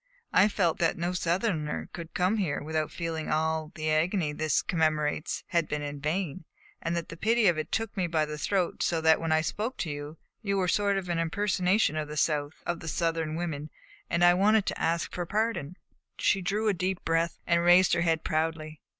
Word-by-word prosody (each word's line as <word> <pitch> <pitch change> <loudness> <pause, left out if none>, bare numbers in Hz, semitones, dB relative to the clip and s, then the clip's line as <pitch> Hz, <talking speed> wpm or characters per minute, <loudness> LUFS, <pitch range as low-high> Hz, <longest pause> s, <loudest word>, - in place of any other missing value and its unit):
I 190 +3 +6
felt 185 -6 0
that 165 -1 +1
no 175 +1 -1
Southerner 170 -3 -1
could 170 -1 -8
come 185 +4 +2
here 175 -9 -1
without 155 0 -1
feeling 165 -2 -4
that - - +1
all 160 0 -1
the 155 -1 -1
agony 160 0 +1
this 155 +1 +1
commemorates 155 -1 0
had 170 -3 +1
been 150 0 -3
in 145 0 -5
vain; 160 +2 -2 0.4
and 170 +1 -1
the 170 - -1
pity 225 +5 +2
of 175 -5 +4
it 155 - -5
took 225 -1 -2
me 185 -2 0
by 160 -2 +1
the 150 0 -6
throat 185 +1 0
so 165 - +1
that 160 0 +4
when 165 -1 -1
I 155 0 +4
spoke 215 +9 -3
to 160 - -3
you, 145 +2 -7 0.2
you 200 -3 -1
were 190 - +1
a - - 0
sort 200 +1 +2
of 190 -2 -3
impersonation 180 +1 +1
of 155 -1 -2
the 150 0 -7
South 150 -1 0
of 175 -1 -2
the 165 - -9
Southern 165 -1 -1
women; 155 -3 -4 0.4
and 170 +1 +1
I 175 - +7
wanted 205 +3 +3
to - - -3
ask 165 0 0
for 175 -1 -3
pardon." 200 -6 -1 0.4
She 195 - +2
drew 205 +4 -1
a 210 - +3
deep 185 0 -2
breath 165 +1 +1
and 170 -1 +3
raised 175 +2 +6
her 170 - +2
head 165 -2 +1
proudly. 155 -1 -2
165 Hz, 210 wpm, -28 LUFS, 155-185 Hz, 0.4 s, I